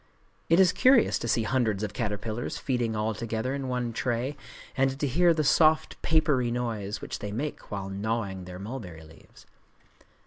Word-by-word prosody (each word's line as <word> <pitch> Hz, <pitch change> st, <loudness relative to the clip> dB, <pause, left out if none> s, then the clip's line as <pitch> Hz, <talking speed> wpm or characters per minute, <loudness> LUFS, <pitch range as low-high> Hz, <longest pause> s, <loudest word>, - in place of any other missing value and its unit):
It 165 Hz, +2 st, +5 dB
is 185 Hz, -2 st, +6 dB
curious 250 Hz, +5 st, +4 dB
to -, -, -4 dB
see 115 Hz, 0 st, +2 dB
hundreds 110 Hz, -5 st, 0 dB
of 105 Hz, -1 st, -3 dB
caterpillars 110 Hz, +2 st, -3 dB
feeding 120 Hz, -4 st, -1 dB
all 110 Hz, +1 st, 0 dB
together 115 Hz, +4 st, -3 dB
in 140 Hz, -1 st, -3 dB
one 125 Hz, -2 st, -2 dB
tray, 125 Hz, +4 st, -1 dB, 0.4 s
and 135 Hz, 0 st, +1 dB
to 145 Hz, -, 0 dB
hear 170 Hz, +6 st, +4 dB
the 155 Hz, -2 st, +1 dB
soft 155 Hz, +2 st, +3 dB
papery 150 Hz, -6 st, +2 dB
noise 115 Hz, -4 st, -3 dB
which -, -, -5 dB
they 105 Hz, -, -5 dB
make 140 Hz, +8 st, -4 dB
while 100 Hz, -2 st, -4 dB
gnawing 100 Hz, -1 st, -3 dB
their 90 Hz, 0 st, -8 dB
mulberry 95 Hz, -6 st, -7 dB
leaves. 80 Hz, +1 st, -17 dB
120 Hz, 170 wpm, -27 LUFS, 105-135 Hz, 0.4 s, is